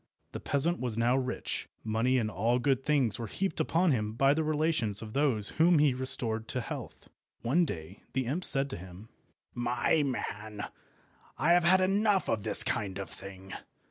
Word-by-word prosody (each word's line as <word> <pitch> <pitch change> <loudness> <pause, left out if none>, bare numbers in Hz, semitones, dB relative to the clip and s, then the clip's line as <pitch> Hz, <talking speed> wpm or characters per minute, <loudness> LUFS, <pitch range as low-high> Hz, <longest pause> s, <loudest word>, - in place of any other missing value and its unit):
The - - -6
peasant 165 +5 0
was 120 -4 -2
now 120 +2 +2
rich. 130 -2 -3
Money 115 +4 +1
and 110 -3 -1
all 115 +5 +1
good 135 +1 0
things 135 -8 +1
were 115 - -4
heaped 190 - -3
upon 170 +1 +2
him 105 -4 -1
by 135 +4 +3
the 160 +2 0
relations 155 -9 0
of 110 -1 -9
those 130 -8 +2
whom 170 0 +5
he 145 -3 +4
restored 115 -3 0
to 125 - -2
health. - - -8 0.4
One 160 +9 +2
day 90 - -7
the 130 0 -1
imp 150 +10 -2
said 135 -4 +5
to - - -5
him— 95 +4 -12 0.4
"My 120 +5 +1
man, 110 -6 -4 0.7
I 160 - +2
have 175 -1 +3
had 185 +2 +5
enough 200 +1 +2
of 110 - 0
this - - +2
kind 95 -2 -2
of 100 -3 -6
thing. 95 -1 -10
125 Hz, 180 wpm, -30 LUFS, 110-150 Hz, 0.7 s, whom